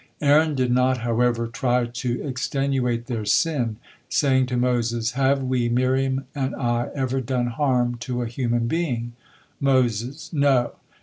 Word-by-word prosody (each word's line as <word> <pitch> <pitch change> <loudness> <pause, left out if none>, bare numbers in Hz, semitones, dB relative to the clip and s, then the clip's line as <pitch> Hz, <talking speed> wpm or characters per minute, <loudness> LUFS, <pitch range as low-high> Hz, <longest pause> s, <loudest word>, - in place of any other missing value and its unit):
Aaron 150 +1 +4
did 130 -2 +1
not, 125 +1 +3
however, 120 0 +1
try 120 +1 0
to 120 +1 -3
extenuate 130 -3 -1
their 115 -4 -3
sin, 120 +2 +1 0.3
saying 130 -4 +2
to 125 -1 -2
Moses: 120 -1 0
"Have 135 +1 +1
we, 125 -2 0
Miriam 130 +2 +1
and 135 -2 -2
I, 120 -1 -1
ever 135 -1 -1
done 125 0 -1
harm 120 -1 0
to 125 0 -3
a - - -3
human 120 0 -1
being?" 120 -6 -2 0.5
Moses: 130 - 0
"No." 140 -5 +3
125 Hz, 140 wpm, -23 LUFS, 120-135 Hz, 0.5 s, Aaron